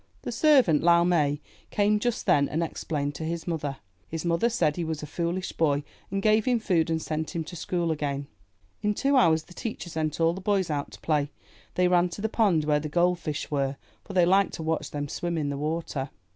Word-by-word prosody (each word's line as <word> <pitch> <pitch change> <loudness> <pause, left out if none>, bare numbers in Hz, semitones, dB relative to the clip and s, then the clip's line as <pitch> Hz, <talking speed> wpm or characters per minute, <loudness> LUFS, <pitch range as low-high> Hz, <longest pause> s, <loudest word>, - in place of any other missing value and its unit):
The - - -3
servant, 245 - +4
Lau 170 0 +5
Mai, 150 -5 +2 0.3
came 210 +1 +2
just 240 +1 -1
then 140 -1 +3
and 160 +3 0
ex 165 - -5
plained 145 -2 -2
to 160 - -6
his 165 +1 -3
mother. 150 -5 -3 0.3
His 165 +1 -5
mother 170 +7 +2
said 190 -11 +1
he 175 - -2
was 160 -2 -3
a - - -3
foolish 170 +4 -2
boy, 145 -3 +1 0.3
and 195 +1 -2
gave 215 0 +4
him 245 -2 +2
food 175 -7 +1
and 160 0 +1
sent 160 +2 -4
him 165 - -1
to 175 - -9
school 170 0 -1
again. 145 -2 -2 0.6
In 210 0 0
two 275 +4 +2
hours 160 -9 +4
the 180 - -15
teacher 215 -4 -5
sent 155 -1 -2
all 165 0 +3
the 190 - -7
boys 195 -3 +1
out 145 -1 -2
to - - -11
play. 150 -3 +1 0.5
They 180 0 +3
ran 180 0 +3
to 175 - -7
the 220 - 0
pond 195 -9 +2
where 150 -1 +3
the 150 +1 -5
gold 175 +2 +2
fish 155 -2 -4
were, 140 -1 0 0.3
for 200 - -9
they 180 -2 +5
liked 195 +2 +3
to 160 - -5
watch 160 0 -1
them 145 0 -4
swim 170 +3 -3
in 145 -2 -1
the - - -3
water. 150 -2 -3
165 Hz, 230 wpm, -27 LUFS, 150-185 Hz, 0.6 s, Lau